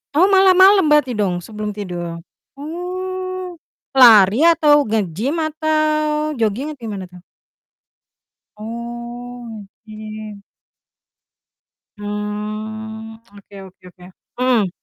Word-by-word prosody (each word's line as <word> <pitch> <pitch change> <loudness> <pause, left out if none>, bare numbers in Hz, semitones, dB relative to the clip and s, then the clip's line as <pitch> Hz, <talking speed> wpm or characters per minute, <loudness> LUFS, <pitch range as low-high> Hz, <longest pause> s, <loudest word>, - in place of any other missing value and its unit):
Oh, 360 +5 +5
malam-malam 380 -1 +6
berarti 295 -4 +3
dong, 180 -4 -1
sebelum 210 0 -6
tidur? 175 -4 -6 0.3
Oh, 365 +3 -6 0.3
lari, 225 -4 +7
atau 295 -5 +4
nge-gym, 215 - -1
atau 305 -1 0
joging? 230 +7 -1
Atau, 290 - -12
gimana 195 -3 -5
tuh? 180 - -13 1.4
Oh, 235 0 -8 0.2
nge-gym. 215 -1 -9 1.6
Hmm, 215 +2 -6 0.2
oke 200 0 -16
oke 185 - -18
oke. 180 0 -19 0.4
Mhm. 245 -6 +2
235 Hz, 90 wpm, -19 LUFS, 210-305 Hz, 1.6 s, lari